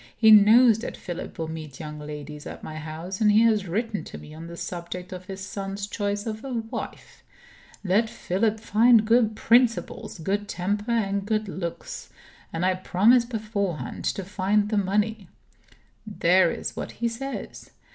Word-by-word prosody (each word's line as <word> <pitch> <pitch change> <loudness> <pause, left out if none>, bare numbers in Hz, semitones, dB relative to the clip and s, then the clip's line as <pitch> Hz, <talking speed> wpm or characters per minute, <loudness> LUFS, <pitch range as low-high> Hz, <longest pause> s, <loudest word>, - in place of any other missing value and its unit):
He 220 -1 +6
knows 220 +2 +7
that - - -6
Philip 175 -1 -7
will 160 - -3
meet 155 -4 -7
young 150 -1 -7
ladies 150 0 -8
at - - -9
my 155 - -7
house; 160 +5 -6
and 210 -1 +5
he 210 +2 +5
has 215 -4 +3
written 215 +4 -2
to - - -8
me 150 - -12
on 165 +2 -9
the 170 0 -9
subject 180 +1 -6
of 185 0 -8
his 190 0 -7
son's 195 0 -4
choice 205 0 -2
of 220 0 -5
a 270 - -5
wife. 225 -1 -6 0.6
'Let 210 +4 +2
Philip 215 +4 -1
find 225 +1 +5
good 225 -1 +3
principles, 230 -2 +2
good 200 +5 -2
temper, 205 +5 -2
and 200 -4 0
good 215 +1 -1
looks; 175 -3 -6 0.4
and 165 +2 -1
I 185 - +3
promise 210 +6 +4
beforehand 210 -7 -3
to 195 - -1
find 205 +2 +1
the 215 - 0
money.' 205 0 0 0.8
There 185 -3 +4
is - - -4
what - - -5
he 235 - -1
says. 265 +4 -6
205 Hz, 165 wpm, -25 LUFS, 180-220 Hz, 0.8 s, knows